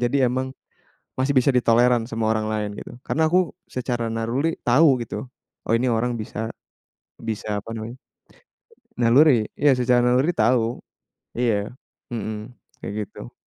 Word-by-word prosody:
jadi 140 - +1
emang 130 +1 -2 0.7
masih 135 +2 +2
bisa 130 +2 +4
ditolerant 120 0 +4
sama 115 -1 -1
orang 110 -1 0
lain 105 -1 -1
gitu. - - -9
Karena 160 +1 +2
aku 180 -3 +2 0.2
secara 120 -2 -2
naruli 120 +8 -1
tahu 135 +1 +5
gitu, 105 - -5 0.4
oh - - 0
ini 125 +2 +1
orang 120 +1 0
bisa, 110 +1 -4 0.7
bisa 105 -2 -3
apa 115 - -10
namanya 115 +3 -6 1.0
naluri 120 -1 +5
iya 145 -1 +5
secara 125 0 +3
naluri 125 +6 +3
tahu. 115 +1 +2 0.6
Iya, 110 -4 0 0.4
mhm, 110 +1 -5 0.3
kayak - - -4
gitu. - - -11
120 Hz, 140 wpm, -23 LUFS, 110-130 Hz, 1.0 s, tahu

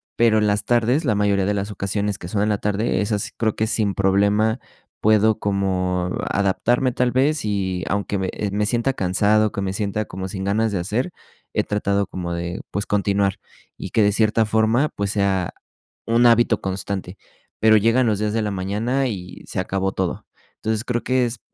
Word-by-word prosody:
Pero 115 -2 +4
en 105 - +2
las 105 +1 0
tardes, 120 +6 +2
la 110 - +2
mayoría 100 -2 +1
de 105 - +1
las 100 0 -2
ocasiones 100 0 -2
que 85 - -8
son 100 +2 -1
en 105 - +1
la 105 - +1
tarde, 105 -1 0
esas 105 -1 -2
creo 110 -2 0
que 110 - 0
sin 105 -3 0
problema 100 +4 +2 0.4
puedo 110 0 +4
como 90 -2 0 0.2
adaptarme, 120 +6 +1
tal 125 0 +1
vez, 140 +1 +1
y 95 -3 -1
aunque 100 0 -1
me 95 -1 -2 0.2
me 105 +1 0
sienta 120 +4 0
cansado, 105 +3 +2
que 100 - -4
me 95 -1 -2
sienta 105 +1 -2
como 95 0 -6
sin 95 0 -5
ganas 110 +2 +1
de 95 - 0
hacer, 110 - -2 0.4
he - - +1
tratado 100 -1 0
como 90 -2 -5
de, 85 +1 -4
pues, 100 - -2
continuar 100 -1 0 0.4
y 95 - -6
que 110 +3 +2
de 105 - +4
cierta 110 +1 +2
forma, 110 +6 +2
pues, 100 0 -3
sea 100 -3 0 0.5
un 115 +1 +3
hábito 120 -1 +4
constante. 95 -1 -4 0.4
Pero 110 0 +6
llegan 115 +4 +3
los 105 -3 +1
días 105 0 -1
de 115 - +1
la 105 - -1
mañana 105 +8 -1
y 90 -6 -7
se - - -4
acabó 95 0 -1
todo. 95 -2 -3 0.3
Entonces, 110 0 -2
creo 120 -2 -1
que 130 -1 +2
es, 120 -1 -4
105 Hz, 190 wpm, -22 LUFS, 95-110 Hz, 0.5 s, Pero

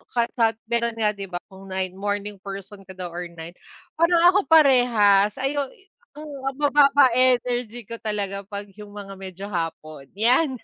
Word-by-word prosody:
kasab 230 -1 +1 0.2
meron 235 -1 0
nga 215 -2 +1
'di 200 -1 -8
ba 175 -1 -6
kung 190 0 -13
9 190 -1 -3
morning 205 0 -3
person 195 0 -9
ka 190 - -10
daw 180 -1 -6
or 175 +1 -5
night, 165 +2 -10 0.4
parang 335 0 +4
ako 390 +2 +1
parehas 235 -9 +5
ayo 280 +1 -1 0.5
'yong 300 0 -9 0.3
mababa 285 -1 +5
energy 245 -2 +1
ko 230 - -7
talaga 200 -2 -3
kapag 205 -1 -7
'yung 210 -1 -10
mga 200 -1 -8
medyo 190 0 -8
hapon, 155 -5 -5
iyan 255 +6 +3
210 Hz, 160 wpm, -23 LUFS, 195-250 Hz, 0.5 s, parehas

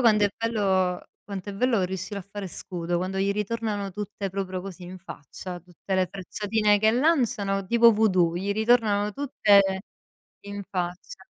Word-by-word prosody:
quando 215 -4 +5
è 205 - +2
bello 195 -5 +1 0.2
quanto 200 -1 -6
è - - -7
bello 230 -2 +2
riuscire 190 +2 -4
a - - -10
fare 200 +1 -7
scudo, 175 -1 -3
quando 185 +2 -3
gli 195 +1 +2
ritornano 210 -1 -2
tutte, 205 0 -5
proprio, 190 -1 -3
così 190 -1 -9
in 185 +1 -9
faccia, 180 +1 -8
tutte 180 +2 -6
le 185 -1 +2
frecciatine 210 +2 +1
che 220 +1 +4
lanciano, 240 -8 +1
tipo 235 +2 +6
vudù, 185 -6 +3
gli 195 +3 -1
ritornano 215 -2 +2
tutte 230 -6 +4 0.8
in 200 0 -6
faccia. 180 - -5
200 Hz, 160 wpm, -26 LUFS, 185-220 Hz, 0.8 s, tipo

